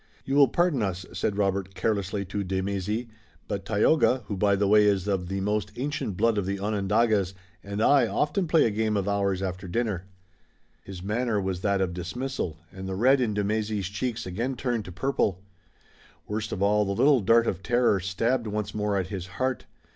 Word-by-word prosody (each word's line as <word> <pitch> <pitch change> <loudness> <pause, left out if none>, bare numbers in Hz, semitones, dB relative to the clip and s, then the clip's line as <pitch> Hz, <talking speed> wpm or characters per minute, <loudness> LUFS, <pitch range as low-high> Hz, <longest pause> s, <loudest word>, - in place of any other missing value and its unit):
"You 135 - -2
will 140 -1 +7
pardon 170 -1 +1
us," 95 -3 -2
said 95 +4 -1
Robert 95 -1 -1
carelessly 100 -2 -1
to 100 +2 -3
de 95 0 -2
Mézy, 100 +4 -2 0.4
"but 100 -1 -4
Tayoga, 125 +4 +3
who 100 - -4
by 100 +1 +3
the 100 +1 +1
way 105 +1 +6
is 100 -2 +2
of 95 -3 -1
the 95 +1 -3
most 105 +1 -1
ancient 130 -8 -3
blood 115 0 +2
of 95 - -3
the 100 0 -1
Onondagas, 105 -1 +1 0.3
and 100 +2 -2
I 145 +2 +5
often 170 +5 0
play 160 0 +4
a 115 - +1
game 110 0 0
of 100 0 -1
ours 100 -2 0
after 95 0 -4
dinner." 100 -2 -2 0.8
His 95 -2 -9
manner 110 +1 0
was 95 -2 -2
that 100 -1 +1
of 90 -2 0
dismissal, 90 - -4
and 95 +1 -7
the 95 - -3
red 130 +6 +4
in 110 -4 0
de 105 - 0
Mézy's 105 -2 -1
cheeks 115 +3 -3
again 115 +9 -2
turned 120 -4 -2
to 90 - -8
purple. 95 -2 -1 0.8
Worst 105 +1 -3
of 100 - -2
all, 105 +1 +3
the 100 -1 -1
little 140 +4 +5
dart 115 +4 +4
of 95 -5 -2
terror 120 -3 +2
stabbed 115 +6 0
once 105 0 -3
more 105 -1 0
at 95 -1 -2
his 95 -3 -5
heart. 130 0 -1
105 Hz, 200 wpm, -26 LUFS, 95-115 Hz, 0.8 s, will